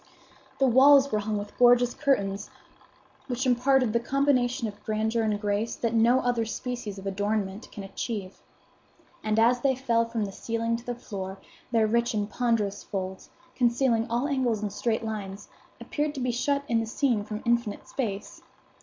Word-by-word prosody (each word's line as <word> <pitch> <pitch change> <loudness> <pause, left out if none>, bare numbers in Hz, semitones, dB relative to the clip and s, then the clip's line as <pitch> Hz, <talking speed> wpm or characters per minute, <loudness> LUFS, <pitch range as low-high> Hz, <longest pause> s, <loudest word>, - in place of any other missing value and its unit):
The 270 - +3
walls 275 +2 +6
were 215 - +1
hung 210 0 -2
with 205 0 -6
gorgeous 245 0 +5
curtains, 200 -9 0 0.8
which 255 0 -2
imparted 255 -1 +3
the 235 - +3
combination 255 -2 +1
of 205 -1 -10
grandeur 220 +1 0
and 215 -2 0
grace 210 +2 -1
that 230 -1 -2
no 235 +3 +4
other 245 -2 +1
species 225 -2 -5
of 195 - -9
adornment 205 +1 -2
can 205 - -7
achieve; 195 -1 -5 0.8
and 215 0 0
as 240 +2 +4
they 265 0 +2
fell 235 -3 +1
from 230 -2 -2
the 195 - -6
ceiling 230 +3 -2
to 235 - -7
the 245 - -2
floor, 195 -5 -6 0.3
their 225 -2 +3
rich 235 +2 +1
and 205 0 -2
ponderous 225 -5 0
folds, 190 -1 -5 0.2
concealing 235 -2 +2
all 240 +4 0
angles 250 -7 0
and 205 -2 -3
straight 225 +1 -1
lines, 205 -2 -6 0.3
appeared 295 0 -2
to 255 -2 -1
shut 280 +4 0
in 230 -1 +2
the 225 - -2
scene 235 -3 +1
from 210 0 -6
infinite 235 -3 0
space. 210 -7 -4
230 Hz, 170 wpm, -27 LUFS, 210-245 Hz, 0.8 s, walls